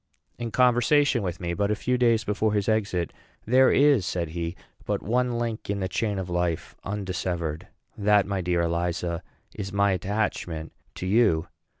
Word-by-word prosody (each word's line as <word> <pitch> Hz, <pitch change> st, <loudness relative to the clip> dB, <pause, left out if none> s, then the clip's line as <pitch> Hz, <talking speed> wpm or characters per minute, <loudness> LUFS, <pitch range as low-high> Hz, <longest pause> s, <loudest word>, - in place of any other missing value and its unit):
In 120 Hz, -1 st, -3 dB
conversation 125 Hz, +2 st, +3 dB
with 90 Hz, -4 st, -3 dB
me 85 Hz, -1 st, -2 dB
but 100 Hz, +3 st, 0 dB
a 105 Hz, -, +2 dB
few 125 Hz, +4 st, 0 dB
days 115 Hz, -2 st, +3 dB
before 105 Hz, 0 st, 0 dB
his 100 Hz, -2 st, 0 dB
exit, 100 Hz, -7 st, 0 dB, 0.3 s
"There 130 Hz, +3 st, +5 dB
is," 140 Hz, -7 st, +5 dB
said 85 Hz, -2 st, -2 dB
he, 85 Hz, +1 st, -4 dB, 0.3 s
"but -, -, -2 dB
one 125 Hz, +2 st, +1 dB
link 115 Hz, -3 st, -3 dB
in 100 Hz, 0 st, -1 dB
the 95 Hz, -, -1 dB
chain 100 Hz, +3 st, -1 dB
of 95 Hz, -2 st, -3 dB
life 85 Hz, -2 st, -1 dB
undissevered; 90 Hz, -5 st, -3 dB, 0.3 s
that, 105 Hz, -1 st, +3 dB
my 100 Hz, -1 st, -2 dB
dear 90 Hz, -1 st, +1 dB
Eliza, 85 Hz, 0 st, -1 dB, 0.3 s
is 100 Hz, -2 st, -5 dB
my 100 Hz, 0 st, +3 dB
attachment 95 Hz, -5 st, -2 dB, 0.2 s
to -, -, -5 dB
you. 100 Hz, -5 st, +3 dB
100 Hz, 170 wpm, -26 LUFS, 90-115 Hz, 0.3 s, There